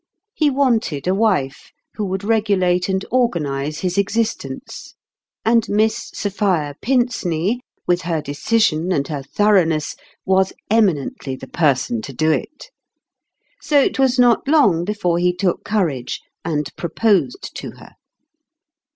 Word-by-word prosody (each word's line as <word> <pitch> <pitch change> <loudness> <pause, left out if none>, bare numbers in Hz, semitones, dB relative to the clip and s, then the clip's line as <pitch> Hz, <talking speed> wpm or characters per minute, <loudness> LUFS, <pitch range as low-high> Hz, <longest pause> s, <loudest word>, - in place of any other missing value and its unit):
He 305 -2 +2
wanted 235 - 0
a 185 - +2
wife 190 -11 0 0.2
who 210 - -3
would 190 0 -3
regulate 200 -5 +1
and 190 0 -1
organize 155 - 0
his 185 +1 0
exist 220 +3 0
ence; - - -9 0.5
and 230 0 +3
Miss 215 +2 +1
Sophia 190 -8 -1
Pinceney, 235 -6 0 0.3
with 175 0 +1
her 170 -3 -1
decision 160 +4 0
and 140 -5 0
her 145 -3 -3
thoroughness, 165 -2 +1 0.3
was 190 0 +2 0.2
eminently 165 -10 +1
the 135 - -10
person 130 -8 +1
to 135 - -8
do 155 +4 +1
it. 295 - -4 0.9
So 295 -2 +3
it 270 - +1
was 265 -1 +3
not 245 +1 +4
long 230 - +4
be 210 +2 -2
fore 175 -4 0
he 180 0 +2
took 180 -1 -1
courage 160 - -1 0.2
and 150 -2 -1
proposed 205 - 0
to - - -6
her. - - -15
190 Hz, 135 wpm, -20 LUFS, 155-225 Hz, 0.9 s, not